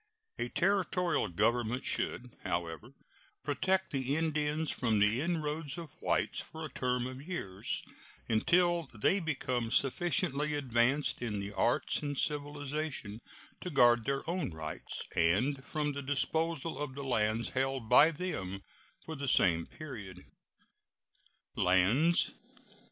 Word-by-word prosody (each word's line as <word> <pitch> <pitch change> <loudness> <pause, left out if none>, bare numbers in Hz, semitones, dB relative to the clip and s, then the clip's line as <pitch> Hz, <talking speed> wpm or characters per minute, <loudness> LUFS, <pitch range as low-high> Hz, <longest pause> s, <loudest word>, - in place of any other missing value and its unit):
A 120 - -1
Territorial 180 -1 +1
government 120 +7 0
should, 125 -1 -1
however, 85 +9 -4 0.5
protect 190 +6 0
the 135 -1 0
Indians 155 -1 0
from 115 -4 0
the 105 +5 +3
inroads 155 -2 -2
of 165 -4 -7
whites - - 0
for 160 0 -8
a 155 - -8
term 125 -1 0
of 130 +1 -6
years, 140 - -3 0.4
until 170 +7 +2
they 175 - +2
become 130 -8 -2
sufficiently 150 +2 +1
advanced 130 +1 +2
in 110 -4 -2
the 100 +1 -5
arts - - +1
and 145 -2 -3
civilization 145 -6 -2 0.4
to 180 - -5
guard 120 -6 +5
their 140 +2 -1
own 175 - -1
rights, 80 -2 -5
and 115 +12 +2
from 150 0 -2
the 140 - -4
disposal 160 +3 0
of 145 -3 -4
the 140 - -5
lands 115 -3 +1
held 135 -2 -1
by 135 +7 +7
them 100 - -4 0.4
for 160 - -5
the 140 -1 -4
same 85 -9 +3
period. 105 - -9 1.3
LANDS. 105 - +4
135 Hz, 125 wpm, -32 LUFS, 115-155 Hz, 1.3 s, by